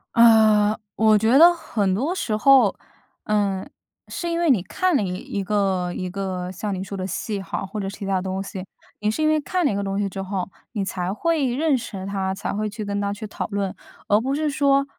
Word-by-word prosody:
呃， 220 -2 +5 0.2
我 220 -1 +5
觉 225 +7 +4
得 345 +2 +9
很 205 - -1
多 280 - -1
时 220 - -1
候， 255 -3 +5 0.5
嗯， 200 -3 0 0.4
是 345 - -4
因 335 0 -1
为 335 -4 +4
你 225 -8 +3
看 370 - 0
了 275 - +3
一 180 -3 -2
一 195 +2 -4
个 190 -3 0
一 185 - -3
个 185 -1 -4
像 200 +2 -4
你 185 - -4
说 200 - -6
的 185 -1 -3
戏 200 +2 -3
好 195 - -4
或 210 +3 -6
者 195 -1 -3
其 200 0 -7
它 195 -1 0
东 190 +1 -3
西， 190 -1 -6 0.4
你 210 - 0
是 220 +9 -1
因 - - +4
为 310 0 +2
看 360 +4 -1
了 - - +3
一 - - -2
个 200 - -1
东 195 0 -2
西 205 - 0
之 195 0 -5
后， 190 -1 -3 0.3
你 200 -4 -1
才 180 -1 -3
会 310 - 0
认 305 +1 +2
识 200 -6 -5
他， 195 -1 -2
才 - - -4
会 215 +1 -2
去 210 0 -6
跟 200 0 -2
他 200 0 -1
去 205 +2 -6
讨 210 - -5
论。 200 -2 -2 0.3
而 210 +1 +4
不 270 +3 -1
是 305 0 0
说 275 -1 +3
205 Hz, 250 characters per minute, -23 LUFS, 195-255 Hz, 0.5 s, 得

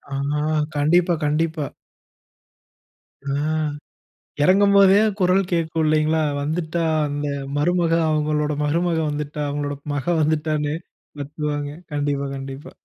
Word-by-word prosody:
ஆஹா, 145 +2 -1 0.3
கண்டிப்பா, 170 +5 +3
கண்டிப்பா. 155 0 0 1.6
அ - - -3 1.2
எறங்கும் 200 +3 +5
போதே 195 0 +7 0.2
குரல் 185 +2 +4
கேட்கும் 165 -1 0
இல்லிங்களா, 155 +1 +2 0.2
வந்துட்டா 160 +3 -2 0.3
அந்த 145 +1 -3 0.3
மருமக 170 +2 +1 0.2
அவங்களோட 150 0 0
மருமக 165 +2 +1
வந்துட்டா, 150 0 -4
அவங்களோட 145 0 -3 0.2
மக 135 -3 -2 0.2
வந்துட்டான்னு 150 -1 0 0.5
கத்துவாங்க. 145 0 -3 0.2
கண்டிப்பா, 145 -1 -1
கண்டிப்பா. 135 +2 -8
150 Hz, 100 wpm, -22 LUFS, 145-165 Hz, 1.6 s, போதே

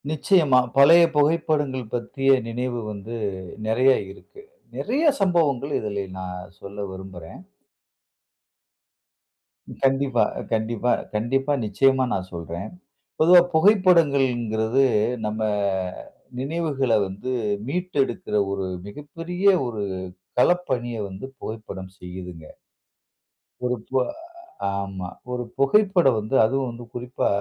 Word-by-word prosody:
நிச்சயமா. 155 -3 +4 0.2
பழைய 165 +5 +8
புகைப்படங்கள் 145 -5 +1
பற்றிய 135 +3 +2
நினைவு 120 +1 -3
வந்து 105 +3 -7 0.5
நிறையா 130 +4 +4 0.2
இருக்கு. 410 - -15 0.4
நிறையா 290 +7 +1
சம்பவங்கள் 150 -7 +2
இதிலே 100 -2 -3 0.2
நான் 90 0 -7
சொல்ல 100 +1 -7
விரும்புறேன். 95 - -10 2.4
கண்டிப்பா. 135 -2 +3 0.3
கண்டிப்பா, 115 +2 0 0.2
கண்டிப்பா. 135 +6 0
நிச்சயமா 130 +4 +3
நான் 95 -1 -3
சொல்றேன். 85 0 -6 0.5
பொதுவா 175 +3 +8
புகைப்படங்கள்ங்கிறது, 140 - +3 0.4
நம்ம 105 +1 -3 1.0
நினைவுகள 140 -3 -1 0.2
வந்து 100 +7 -6 0.4
மீட்டு 180 +3 -3
எடுக்குற 115 -3 -5 0.2
ஒரு 100 -1 -2 0.2
மிகப்பெரிய 165 - -6 0.2
ஒரு 110 -3 -4 0.6
களப்பணிய 125 -8 +1
வந்து 95 +6 -8
புகைப்படம் 100 -4 -7
செய்யுதுங்க. 90 -2 -9 1.2
ஒரு 125 0 +1
பு 130 - +1 0.8
ஆமா. 95 -2 -5 0.2
ஒரு 125 0 -2 0.2
புகைப்படம் 175 - +4
வந்து 110 +5 -3
அதுவும் 130 +2 0
வந்து 120 0 -9
குறிப்பா 125 +1 -2
125 Hz, 95 wpm, -24 LUFS, 105-150 Hz, 2.4 s, பழைய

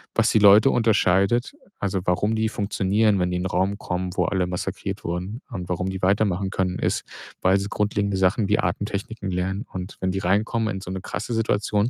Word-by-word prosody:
was 115 0 +3
die 110 - +4
Leute 105 +5 +7
unterscheidet 110 - +2 0.3
also, 95 -2 -1
warum 100 +5 +1
die 110 0 +1
funktionieren, 100 0 +1
wenn 90 0 +1
die - - -1
in 90 - -2
'nen - - -1
Raum 95 +3 0
kommen, 90 -1 -3
wo - - +2
alle 95 -2 0
massakriert 90 0 -4
wurden 90 +8 -4
und 90 -5 -6
warum 90 +1 -1
die 95 - -5
weitermachen 95 0 +1
können, 90 -1 -1
ist, - - 0 0.4
weil 95 +1 +4
sie 100 - -3
grundlegende 100 -1 0
Sachen 95 +3 +2
wie 105 - +3
Atemtechniken 100 +3 -3
lernen. 95 +4 -2
Und 90 +1 -6
wenn 95 - 0
die 95 - -3
reinkommen 110 +4 0
in 95 - -5
so 90 - -8
'ne 95 -1 -4
krasse 120 - -4
Situation, 105 0 +1
100 Hz, 200 wpm, -24 LUFS, 90-105 Hz, 0.4 s, Leute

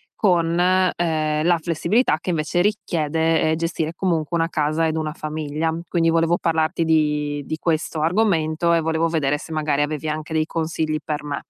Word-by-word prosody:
con, 170 -4 +2
ehm, 170 -4 +1
la 175 -1 +4
flessibilità 170 - +1
che - - -6
invece 165 +2 0
richiede, 165 -5 +1
ehm, - - +2
gestire 165 -1 -2
comunque 170 -2 -1
una 165 0 0
casa 155 +1 0
ed 160 - -1
una 155 -1 -2
famiglia. 155 0 -3 0.2
Quindi, 165 -2 +1
volevo 165 +1 +2
parlarti 160 0 0
di 150 -2 +1
di 155 - -4
questo 160 -1 -1
argomento 170 -2 +1
e 165 - +4
volevo 160 +1 0
vedere 145 -3 0
se, 155 - -10
magari, 150 -2 0
avevi 155 +1 -3
anche 155 +1 -4
dei 155 -1 +1
consigli 160 -2 -2
per 150 -1 -3
me. 145 -1 -4
160 Hz, 170 wpm, -22 LUFS, 155-170 Hz, 0.2 s, la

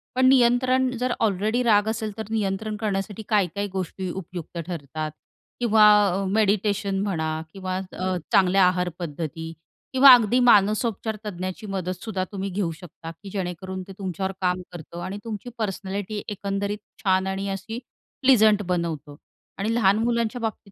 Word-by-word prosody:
पण 260 0 +3
नियंत्रण 255 0 +4
जर 250 0 0
ऑलरेडी 215 +3 +1
राग 210 -2 +4
असेल, 220 -1 -2
तर 220 - -3
नियंत्रण 215 0 -1
करण्यासाठी 210 0 -3
काय-काय 200 -1 +1
गोष्टी 185 0 -3
उपयुक्त 175 -2 -7
ठरतात? 155 -2 -4 0.5
किंवा 220 -3 +5 0.3
अ, 195 +2 -1
मेडिटेशन 200 -1 +1
म्हणा 160 -6 -1 0.2
किंवा 185 -1 -4 0.2
अ, 185 0 -2 0.2
चांगल्या 190 0 +5
आहारपद्धती 165 -3 -3 0.4
किंवा 265 +1 +9
अगदी 240 +2 +2
मानसोपचार 220 -1 +3
तज्ज्ञाची 185 +1 -5
मदतसुद्धा 185 +1 -3
तुम्ही 195 0 -3
घेऊ 185 -3 -1
शकता, 165 0 -10
की 195 +4 -12
जेणेकरून 185 0 -4
ते - - -9
तुमच्यावर 190 0 -3
काम 180 0 +1
करतं 170 0 -9
आणि 195 +2 -5
तुमची 225 +1 -6
पर्सनॅलिटी 205 0 -3
एकंदरीत 200 0 -2 0.3
छान 190 -1 +2
आणि 195 +1 -2
अशी 195 +5 -5 0.4
प्लीझंट 220 -6 +5
बनवतो 160 -5 -3 0.4
आणि 215 +4 -1
लहान 200 -3 +4
मुलांच्या 235 0 0
बाबतीत 220 -2 -4
195 Hz, 140 wpm, -24 LUFS, 185-220 Hz, 0.5 s, किंवा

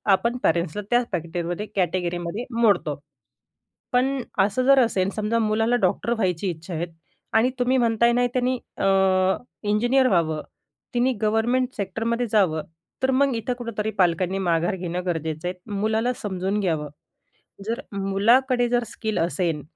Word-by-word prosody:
आपण 235 +5 -1
पॅरेंट्सला 170 +3 +1
त्याच 240 0 +3
पॅकेटमध्ये, 175 +2 -3
कॅटेगरीमध्ये 175 +3 -1 0.2
मोडतो. 175 - +2 0.9
पण 265 +2 +2 0.2
असं 205 +6 +2
जर 275 0 +6
असेल 195 -6 +2
समजा 215 +2 0
मुलाला 225 +2 +2
डॉक्टर 235 - +1
व्हायची 190 -4 -1
इच्छा 170 +1 -7
आहे 165 +1 -1 0.5
आणि 225 +3 +4
तुम्ही 250 +1 +2
म्हणताय 235 -1 +3
ना 245 +1 +3
त्यांनी 255 0 +1 0.2
अ, - - -1 0.8
इंजिनियर 240 +5 +3
व्हावं 160 -7 +1 0.5
त्यांनी 250 +2 +2
गव्हर्नमेंट 225 +4 +2
सेक्टरमध्ये 225 +5 -1
जावं. 180 -8 +3 0.4
तर 260 - +3
मग 275 +1 +3
इथं 230 +2 -2
कुठेतरी 220 -3 -3
पालकांनी 185 +1 +2
माघार 175 0 +1
घेणं 180 0 -4
गरजेचं 160 -1 -2
आहे. 180 - -2 0.2
मुलाला 220 +4 0
समजून 195 0 -2
घ्यावं. 160 -7 -1 0.8
जर 230 +4 -2
मुलाकडे 235 +6 +2
जर 240 0 +2
स्किल 220 -1 -4
असेल 170 -2 0
210 Hz, 135 wpm, -24 LUFS, 175-240 Hz, 0.9 s, जर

